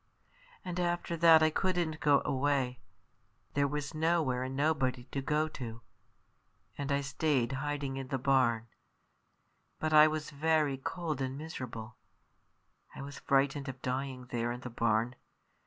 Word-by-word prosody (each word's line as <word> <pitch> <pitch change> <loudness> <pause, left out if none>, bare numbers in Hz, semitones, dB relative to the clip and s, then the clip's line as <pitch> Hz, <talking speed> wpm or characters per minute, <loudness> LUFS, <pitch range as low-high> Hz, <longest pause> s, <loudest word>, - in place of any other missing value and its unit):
And 180 -1 -3
after 175 -1 -1
that 165 -1 +7
I 155 - +4
couldn't 175 -3 0
go 145 -2 +4
away; 130 -2 0 0.7
there 140 0 +2
was 145 +1 -4
nowhere 155 -5 +1
and 130 +1 -3
nobody 135 -4 +1
to 140 - -2
go 150 +3 +1
to; 115 -5 -7 0.9
and 140 0 -3
I 140 0 +2
stayed 135 -3 0
hiding 140 -1 -3
in 135 -1 -5
the 135 - -1
barn. 125 -3 +2 1.1
But 155 0 -1
I 155 0 +9
was 155 0 -3
very 150 -1 +1
cold 155 -1 -3
and 130 0 -2
miserable; 120 -7 -7 1.0
I - - -6
was 140 0 -8
frightened 140 0 +1
of 130 0 -7
dying 130 0 -3
there 120 0 -1
in 120 +1 -6
the 125 - -7
barn. 115 +1 +1
140 Hz, 145 wpm, -32 LUFS, 130-155 Hz, 1.1 s, I